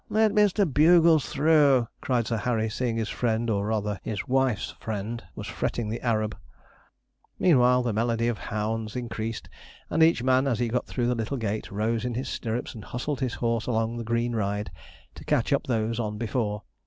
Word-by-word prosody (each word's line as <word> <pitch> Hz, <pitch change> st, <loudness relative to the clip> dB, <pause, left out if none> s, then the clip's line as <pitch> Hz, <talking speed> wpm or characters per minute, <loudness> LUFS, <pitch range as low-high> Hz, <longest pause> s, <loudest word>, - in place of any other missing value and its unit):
'Let 220 Hz, 0 st, +3 dB
Mr. 205 Hz, -1 st, +3 dB
Bugles 160 Hz, +1 st, +5 dB
through,' 140 Hz, -5 st, +4 dB
cried 125 Hz, -3 st, 0 dB
Sir 115 Hz, -, -1 dB
Harry, 110 Hz, 0 st, -1 dB
seeing 120 Hz, 0 st, -1 dB
his 110 Hz, -1 st, -2 dB
friend, 115 Hz, -1 st, 0 dB
or 100 Hz, -1 st, 0 dB
rather 105 Hz, -2 st, -1 dB
his 105 Hz, -4 st, -4 dB
wife's 130 Hz, -4 st, +1 dB
friend, 110 Hz, +2 st, -4 dB
was -, -, -6 dB
fretting 115 Hz, -3 st, -2 dB
the 115 Hz, -, -4 dB
Arab. 110 Hz, -3 st, 0 dB, 1.0 s
Meanwhile, 125 Hz, -6 st, +4 dB
the 120 Hz, -3 st, -1 dB
melody 115 Hz, +1 st, 0 dB
of 120 Hz, -3 st, -1 dB
hounds 110 Hz, +1 st, -3 dB
increased, 115 Hz, -2 st, -4 dB, 0.4 s
and 160 Hz, -, +1 dB
each 160 Hz, -6 st, +4 dB
man, 130 Hz, +1 st, +3 dB
as 120 Hz, -5 st, +1 dB
he 120 Hz, 0 st, 0 dB
got 125 Hz, +2 st, -1 dB
through 120 Hz, -, -1 dB
the 125 Hz, -, +2 dB
little 115 Hz, +4 st, -3 dB
gate, 110 Hz, -2 st, -3 dB
rose 110 Hz, +2 st, -1 dB
in 125 Hz, -2 st, -2 dB
his 130 Hz, -, -3 dB
stirrups 115 Hz, +1 st, -3 dB
and 110 Hz, -4 st, -10 dB
hustled 130 Hz, +3 st, -3 dB
his 130 Hz, -3 st, -2 dB
horse 115 Hz, -1 st, -1 dB
along 115 Hz, -1 st, 0 dB
the 120 Hz, -, -4 dB
green 115 Hz, +1 st, -1 dB
ride 105 Hz, 0 st, -2 dB, 0.4 s
to -, -, -11 dB
catch -, -, +1 dB
up -, -, +1 dB
those 115 Hz, -1 st, 0 dB
on 105 Hz, -2 st, -2 dB
before. 105 Hz, -2 st, -2 dB
115 Hz, 190 wpm, -26 LUFS, 110-125 Hz, 1.0 s, Bugles